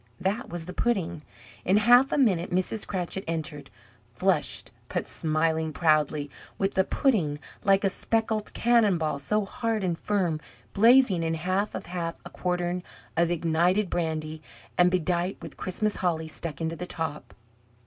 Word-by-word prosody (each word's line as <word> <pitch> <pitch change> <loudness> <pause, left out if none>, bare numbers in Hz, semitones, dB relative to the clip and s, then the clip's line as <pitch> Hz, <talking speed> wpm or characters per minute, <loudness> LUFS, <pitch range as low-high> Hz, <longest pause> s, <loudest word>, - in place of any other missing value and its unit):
That 210 +7 -1
was 170 -1 -5
the 180 - -7
pudding! 180 -8 0 0.4
In 190 +3 +3
half 245 +5 +6
a - - +1
minute 190 -11 +2
Mrs. 185 +4 0
Cratchit 190 0 -3
entered 155 -3 -4 0.5
flushed, - - 0 0.2
but - - -2
smiling 160 0 0
proudly 150 -2 +2 0.3
with 195 0 0
the 190 - +3
pudding, 185 - +1 0.3
like 195 -1 +4
a 195 - +3
speckled 220 0 -1
cannon 230 -6 +4
ball, 155 -3 -1
so 210 +9 0
hard 225 0 -2
and 175 -2 0
firm, 175 -4 0 0.3
blazing 230 -4 +5
in 165 0 0
half 185 +5 -1
of - - -5
half 170 -1 -3
a - - -9
quartern 180 0 -1 0.3
of 170 +1 +3
ignited 175 +4 +1
brandy, 155 -2 -2 0.3
and 180 0 +5
bedight 180 +1 0
with - - -9
Christmas 210 +3 -2
holly 165 -3 0
stuck 155 -2 -5
into 165 0 -1
the 180 +2 -6
top. 160 -4 -4
180 Hz, 155 wpm, -27 LUFS, 160-205 Hz, 0.5 s, half